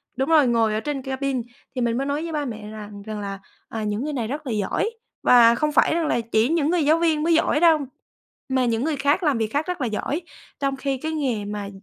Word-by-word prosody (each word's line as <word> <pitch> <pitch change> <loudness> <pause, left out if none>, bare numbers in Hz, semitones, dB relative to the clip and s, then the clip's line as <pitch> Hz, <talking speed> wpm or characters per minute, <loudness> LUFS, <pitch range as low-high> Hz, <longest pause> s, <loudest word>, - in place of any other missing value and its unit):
đúng 265 +4 -1
rồi, 305 -5 +5
ngồi 225 -2 +2
ở 215 - 0
trên 285 +2 -3
cabin. 265 -1 -2 0.3
Thì 250 - -1
mình 235 0 +1
mới 275 - -1
nói 290 +3 -1
với 335 - -4
ba 295 -2 -2
mẹ 215 -3 -6
rằng 210 -1 -9
rằng 215 +1 -6
là, 195 -1 -5 0.3
à, 225 -1 -4
những 210 +4 -2
người 300 0 -3
này 235 -5 -2
rất 285 +3 -5
là - - -2
giỏi 210 - 0 0.3
và 235 -1 +7
không 300 +5 0
phải 305 - +4
rằng 330 -2 0
là 240 - +1
chỉ 225 +1 +1
những 320 -2 +1
người 340 -3 +2
giáo 315 +3 +5
viên 320 -3 +2
mới 335 +1 +3
giỏi 315 -2 +3
đâu, 325 -2 +5 0.7
mà 260 -1 +2
những 230 0 0
người 310 0 0
khác 285 +6 +1
làm 295 -6 +2
việc 220 -1 0
khác 295 +4 0
rất 360 -4 -3
là 250 - +1
giỏi, 265 +9 -2 0.4
trong 275 -1 0
khi 270 0 -2
cái 315 +5 -4
nghề 255 -9 -1
mà, 205 -1 -5
265 Hz, 260 wpm, -23 LUFS, 225-300 Hz, 0.7 s, và